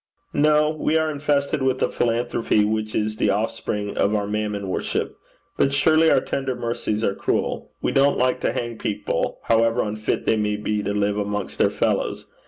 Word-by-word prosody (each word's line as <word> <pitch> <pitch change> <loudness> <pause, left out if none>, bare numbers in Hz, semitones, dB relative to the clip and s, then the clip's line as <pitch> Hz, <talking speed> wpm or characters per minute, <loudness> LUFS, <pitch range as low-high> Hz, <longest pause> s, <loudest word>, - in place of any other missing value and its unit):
'No. 150 +1 +3
We 155 0 0
are 160 0 +1
infested 140 -1 0
with 130 -1 +1
a - - +2
philanthropy 115 -2 +1
which 110 0 -2
is 110 0 -1
the 105 - +2
offspring 105 0 -2
of 100 +2 +2
our 105 -1 0
mammon 105 -1 -2
worship. 95 - -2 0.4
But 140 - +3
surely 155 +3 +4
our 135 - +4
tender 135 -2 -2
mercies 115 -2 -2
are 100 - +1
cruel. - - -2
We - - +1
don't 140 +1 +3
like 125 0 +1
to - - +1
hang 120 -2 -4
people, 105 - -2
however 115 +1 +2
unfit 110 0 -2
they 110 - +2
may 105 -1 0
be 105 0 -2
to 100 - -2
live 105 0 0
amongst 105 -1 -3
their - - +4
fellows. - - -1
115 Hz, 185 wpm, -23 LUFS, 105-135 Hz, 0.4 s, surely